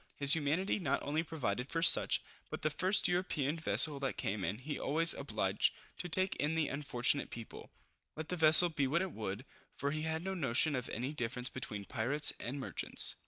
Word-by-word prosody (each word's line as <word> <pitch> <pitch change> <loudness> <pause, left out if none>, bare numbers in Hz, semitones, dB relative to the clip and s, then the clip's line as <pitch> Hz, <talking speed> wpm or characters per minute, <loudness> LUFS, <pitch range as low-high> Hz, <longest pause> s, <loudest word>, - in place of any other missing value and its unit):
His 140 +1 +9
humanity 165 +6 0
not 145 -7 -1
only 150 +3 -1
provided 125 -7 -4
for 165 0 -2
such, - - +4 0.3
but - - -7
the 155 - 0
first 190 +5 +1
European 175 -5 -1
vessel 155 -2 +2
that 135 -1 -3
came 100 0 -3
in, 95 +5 -3
he 145 +5 -6
always 165 +3 +3
obliged 105 -7 -1 0.2
to 175 - -5
take 185 +3 0
in 150 +2 -1
the 160 -2 0
unfortunate 140 -1 -1
people, 115 -1 -10 0.5
let 160 0 -7
the 180 - -2
vessel 160 +1 +7
be 145 -4 -1
what 170 +7 0
it 190 - -5
would; 110 +1 -6 0.3
for 140 - -3
he 155 +1 -3
had 160 +1 -3
no 190 +1 -3
notion 145 -2 +1
of 125 - -4
any 125 +6 -4
difference 125 -2 -3
between 105 -6 -6
pirates 130 +7 0
and 135 +4 -5
merchants. 135 - 0
145 Hz, 195 wpm, -33 LUFS, 125-160 Hz, 0.5 s, His